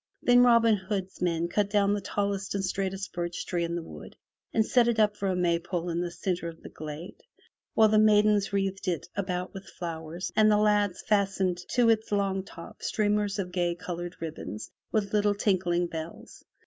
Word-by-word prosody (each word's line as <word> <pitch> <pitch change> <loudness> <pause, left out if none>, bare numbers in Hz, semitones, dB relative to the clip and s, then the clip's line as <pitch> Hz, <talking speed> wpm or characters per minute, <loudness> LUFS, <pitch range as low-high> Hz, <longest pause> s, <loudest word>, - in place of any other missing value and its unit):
Then 245 0 +6
Robin 230 -2 +5
Hood's 190 -1 -4
men 170 -1 +1
cut 205 +3 0
down 200 -1 +3
the 205 - -1
tallest 200 0 -2
and 195 -1 0
straightest 195 +1 -3
birch 175 0 -3
tree 175 -1 -1
in 170 0 -2
the 170 - -3
wood - - -11 0.4
and 220 -1 +2
set 240 0 +4
it 235 -1 +1
up 210 -1 +3
for 200 - -2
a 185 - +1
Maypole 175 0 0
in 170 +1 -1
the 175 - -2
centre 175 0 -3
of 165 - -13
the - - -8
glade, 155 +3 -8 0.6
while 220 - +6
the 215 0 +4
maidens 210 -1 +4
wreathed 195 -1 -1
it 175 -2 -1
about 185 -2 -3
with 195 -1 -9
flowers, 165 +1 -5
and 215 0 +5
the 210 - +4
lads 205 -3 +2
fastened 195 -3 +1 0.2
to 240 -1 +5
its 220 -1 +2
top 205 - +1
long 195 -1 -1 0.3
streamers 210 -1 0
of 185 -3 -3
gay 175 -1 0
colored 175 -1 -6
ribbons 155 -9 -6 0.2
with 210 -2 0
little 205 -1 +3
tinkling 185 -4 +1
bells. 165 -1 -8
195 Hz, 190 wpm, -28 LUFS, 175-210 Hz, 0.6 s, Then